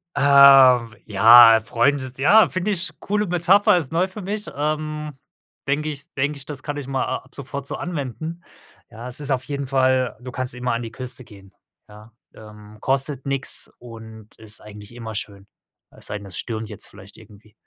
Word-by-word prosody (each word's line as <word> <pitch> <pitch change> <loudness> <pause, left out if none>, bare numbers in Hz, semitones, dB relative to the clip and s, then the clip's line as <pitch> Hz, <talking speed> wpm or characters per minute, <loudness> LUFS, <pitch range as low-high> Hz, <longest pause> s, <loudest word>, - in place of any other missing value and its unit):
Ähm, 135 -4 +6
ja, 115 +3 +8
äh, - - -4
Freunde 130 +4 0
ja, 205 +12 +5
finde 185 +3 -2
ich 185 -3 -1
coole 210 +1 -2
Metapher 180 +2 +3
ist 155 -7 -3
neu 170 +3 +1
für 190 +3 -9
mich. 205 +2 -4
Ähm, 150 +1 -3 0.5
denke 150 +2 -1
ich 145 -1 -7
denke 145 +2 -1
ich, 140 - -11
das 140 -3 -8
kann 145 0 -5
ich 140 -2 -6
mal 135 -1 -1
a - - -2
ab 130 - -18
sofort 140 0 -7
so - - -5
anwenden. 165 +1 -6 0.5
Ja, 115 +1 -10
es 125 +2 -6
ist 145 -1 -2
auf 130 -1 0
jeden 140 0 -5
Fall 130 -1 +1
du 125 0 -8
kannst 130 -1 -4
immer 125 0 -2
an 115 - -2
die 115 -1 -7
Küste 125 +1 -7
gehen, 100 -4 -17 0.3
ja? 105 +2 -15 0.2
Ähm, 105 -1 -14
kostet 135 0 -2
nix 140 -1 -3
und 110 -2 -12
ist 110 -1 -6
eigentlich 105 +1 -13
immer 115 -2 -7
schön. 100 -1 -7 0.4
Es - - -14
sei 105 - -4
denn, 100 -1 -11
es 95 - -8
stürmt 110 -2 -4
jetzt 105 - -6
vielleicht 95 +2 -13
irgendwie. 105 -1 -18
130 Hz, 195 wpm, -22 LUFS, 110-145 Hz, 0.5 s, ja